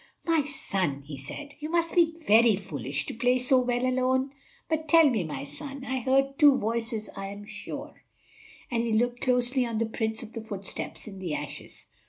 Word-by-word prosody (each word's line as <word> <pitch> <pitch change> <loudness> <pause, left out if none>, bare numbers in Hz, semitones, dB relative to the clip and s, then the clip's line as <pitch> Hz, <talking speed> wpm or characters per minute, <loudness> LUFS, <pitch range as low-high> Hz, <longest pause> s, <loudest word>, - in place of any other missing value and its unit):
"My 330 -2 +3
son," 190 - -2
he 145 +1 -8
said, 285 - -8
"you 305 +1 -5
must 335 0 +1
be 330 -2 +4
very 225 +1 +6
foolish 145 - -3
to - - -5
play 245 +2 +2
so 255 +1 +4
when 245 0 0
alone. 260 +1 +1 0.4
But, 315 -1 -1
tell 325 0 +7
me, 225 -9 +1
my 145 -4 -5
son; 275 - -8
I 260 0 -1
heard 270 +3 +1
two 290 -3 +8
voices, 225 -1 -2
I 195 0 -5
am 200 +1 -8
sure," - - -7 0.7
and 235 -1 +1
he 230 -1 0
looked 245 +2 +1
closely 250 0 +2
on 230 -2 -2
the 230 - +1
prints 220 0 -2
of 230 - -11
the 230 - -5
footsteps 200 -3 -5
in 195 -3 -9
the 175 -5 -2
ashes. 145 0 -7
240 Hz, 195 wpm, -28 LUFS, 200-270 Hz, 0.7 s, two